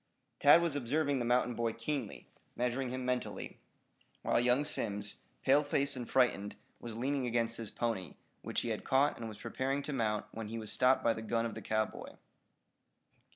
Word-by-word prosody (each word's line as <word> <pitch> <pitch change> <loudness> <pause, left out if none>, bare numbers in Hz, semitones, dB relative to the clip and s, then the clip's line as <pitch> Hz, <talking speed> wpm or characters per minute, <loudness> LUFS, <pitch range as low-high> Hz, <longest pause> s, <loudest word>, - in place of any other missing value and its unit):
Tad 155 +4 +7
was 165 -4 0
observing 145 +1 0
the 120 - -1
mountain 125 0 +2
boy 115 -1 -1
keenly, 125 -1 -4 0.3
measuring 125 +1 -1
him 130 0 -4
mentally, 125 -1 -3 0.6
while - - +2
young 125 +3 +3
Simms, 105 -7 0 0.2
pale 140 +2 +5
faced 140 -1 0
and 125 -2 -6
frightened, 105 -6 +2 0.2
was 115 -2 -7
leaning 135 +1 0
against 115 -1 0
his 115 -3 -5
pony, 110 -9 -3 0.3
which - - -2
he - - -3
had - - -3
caught 140 +2 +3
and 115 -1 -5
was 105 - -9
preparing 135 +2 -2
to 150 - -4
mount 105 -5 0
when 110 -1 -6
he 115 +2 -5
was 110 -2 -4
stopped 130 +1 +3
by 115 - +4
the 110 - -6
gun 115 +1 0
of 115 - -3
the 110 - -7
cowboy. 110 +1 -2
120 Hz, 185 wpm, -33 LUFS, 115-135 Hz, 0.6 s, Tad